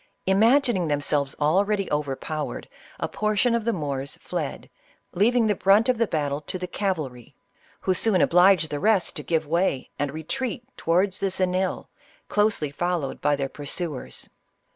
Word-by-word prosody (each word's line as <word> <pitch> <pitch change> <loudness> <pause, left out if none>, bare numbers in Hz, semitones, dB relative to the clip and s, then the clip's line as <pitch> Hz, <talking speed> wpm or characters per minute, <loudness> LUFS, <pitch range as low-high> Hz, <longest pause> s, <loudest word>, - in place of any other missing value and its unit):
Imagining 220 - +3
themselves 145 -1 0
ISABELLA - - -17
OF 145 - -1
CASTILE. 175 +7 +4
98 - - -15
already 205 -2 -1
overpowered, 150 +1 -3 0.3
a - - 0
portion 215 +3 +1
of 230 -2 0
the 235 - +2
Moors 140 -4 -3
fled, - - -5 0.4
leav 215 +7 +3
ing 240 -2 +4
the 210 - +3
brunt 205 +5 +4
of 250 -3 +2
the 230 - +2
battle 145 -4 -1
to 155 - -4
the 180 - -4
cavalry, 160 - -4 0.5
who 185 - +1
soon 200 0 +2
obliged 180 -2 +4
the 145 - -2
rest 205 -1 +2
to - - -4
give 160 -2 0
way 165 -3 0
and 145 -1 -1
retreat 235 - -4
towards 185 +3 +1
the 195 - 0
Xenil, 185 0 -1 0.4
closely 205 -8 +1
followed 175 -3 -2
by 145 - +2
their 140 -1 -2
pursuers. 145 +1 -5
180 Hz, 170 wpm, -25 LUFS, 150-205 Hz, 0.5 s, CASTILE